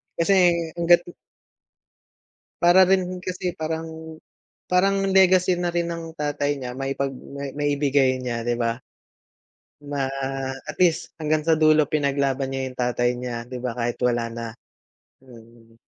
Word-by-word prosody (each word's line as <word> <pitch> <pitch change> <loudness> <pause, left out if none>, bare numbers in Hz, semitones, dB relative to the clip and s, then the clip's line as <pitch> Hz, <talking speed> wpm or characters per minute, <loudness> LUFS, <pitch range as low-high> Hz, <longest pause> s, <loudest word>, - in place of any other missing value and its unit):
Kasi 170 +4 +2 0.4
hangga't 170 0 +5 1.6
Para 175 +2 +6
rin 185 -1 +1
kasi, 185 -1 -3
parang 160 0 -6 0.5
parang 195 +2 +2
legacy 185 -1 +5
na 175 - 0
rin 170 0 -1
ng 165 -1 -5
tatay 145 -1 -1
niya 125 -2 -5
maipag 135 0 -2
ma 140 +1 -8
maibigay 140 -2 +2
niya, 120 -2 -3
'di 120 0 0
ba? 115 0 0 1.1
Ma 140 -2 -2 0.6
at - - -3
least 170 -3 +2
hanggang 155 0 0
sa 165 - +4
dulo 155 -1 +5
pinaglaban 140 -2 0
niya 135 0 -3
yung 130 -1 -9
tatay 120 0 +1
niya, 125 -1 -4
'di 125 +1 -7
ba? 125 -1 -2
Kahit 120 0 -2
wala 120 -1 +1
na. 115 0 -5 0.7
Mm. 115 -2 -17
145 Hz, 135 wpm, -23 LUFS, 125-170 Hz, 1.6 s, Para